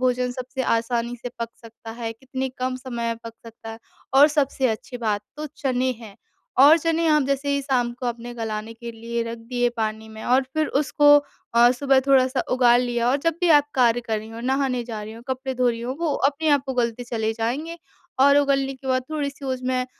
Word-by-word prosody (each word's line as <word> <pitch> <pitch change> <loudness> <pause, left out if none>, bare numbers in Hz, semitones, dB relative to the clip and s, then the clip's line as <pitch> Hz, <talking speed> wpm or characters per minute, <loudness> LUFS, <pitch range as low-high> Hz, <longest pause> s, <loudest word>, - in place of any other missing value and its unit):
भोजन 250 -1 +1
सबसे 255 +1 -5
आसानी 235 0 0
से - - -3
पक 230 0 -3
सकता 230 0 -11
है, 230 -1 -5
कितने 265 +3 -5
कम 255 0 -1
समय 250 -2 -5
में 230 - -2
पक 230 - -7
सकता 225 0 -10
है 225 - -9 0.4
और 285 +2 +8
सबसे 280 -3 +1
अच्छी 225 +3 -4
बात 210 -3 -1
तो 305 +1 -4
चने 260 -2 0
हैं। 215 -4 -11 0.5
और 310 +3 +8
चने 330 +1 0
आप 300 -1 +4
जैसे 280 +1 -1
ही 280 - -1
शाम 250 -3 0
को 250 - -2
अपने 240 0 -4
गलाने 220 -1 -4
के 235 0 -8
लिए 230 +1 -4
रख 230 0 -6
दिए 245 +1 -1
पानी 220 0 -3
में 220 0 -10
और 255 +2 +3
फिर 310 0 +1 0.2
उसको 295 0 +1 0.5
अ, 240 +1 +7
सुबह 270 +1 +3
थोड़ा-सा 260 -1 +3
उगाल 245 -1 +5
लिया 240 -1 0
और 270 - +3
जब 330 -1 +2
भी 355 - +2
आप 290 -2 +5
कार्य 245 -2 +3
कर 225 -2 -2
रही 215 +1 -9
हो, 225 +1 -8
नहाने 260 0 0
जा 225 -3 -6
रही 215 +1 -8
हो, 230 +1 -11
कपड़े 260 0 -3
धो 250 0 +2
रही 230 -1 -2
हो, 245 +2 -3
वो 330 -3 0 0.2
अपने 300 +3 -2
आप 275 - -7
को 265 - -3
गलते 245 0 -1
चले 225 -2 -2
जाएँगे 265 +10 -3 0.4
और 280 +1 +6
उगलने 275 -1 +1
के 265 +1 -13
बाद 255 0 +1
थोड़ी 295 -2 -2
सी 280 0 -13
उसमें 255 -1 -1
250 Hz, 220 wpm, -23 LUFS, 230-270 Hz, 0.5 s, और